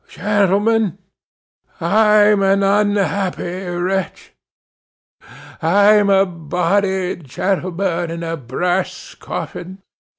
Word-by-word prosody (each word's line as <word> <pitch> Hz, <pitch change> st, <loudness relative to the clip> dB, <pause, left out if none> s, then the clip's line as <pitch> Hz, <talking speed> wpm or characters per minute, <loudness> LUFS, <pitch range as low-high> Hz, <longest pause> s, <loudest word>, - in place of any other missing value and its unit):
Gentlemen, 205 Hz, +1 st, +1 dB, 0.8 s
I'm 210 Hz, +3 st, +4 dB
an 195 Hz, 0 st, +2 dB
unhappy 195 Hz, -2 st, 0 dB
wretch. 180 Hz, +2 st, -3 dB, 1.3 s
I'm 205 Hz, +4 st, +4 dB
a 195 Hz, 0 st, +4 dB
body, 180 Hz, +3 st, -1 dB
gentlemen, 175 Hz, +3 st, -2 dB
in 165 Hz, 0 st, -6 dB
a 165 Hz, 0 st, -3 dB
brass 175 Hz, +7 st, -3 dB
coffin. 190 Hz, +2 st, -7 dB
190 Hz, 75 wpm, -18 LUFS, 175-200 Hz, 1.3 s, I'm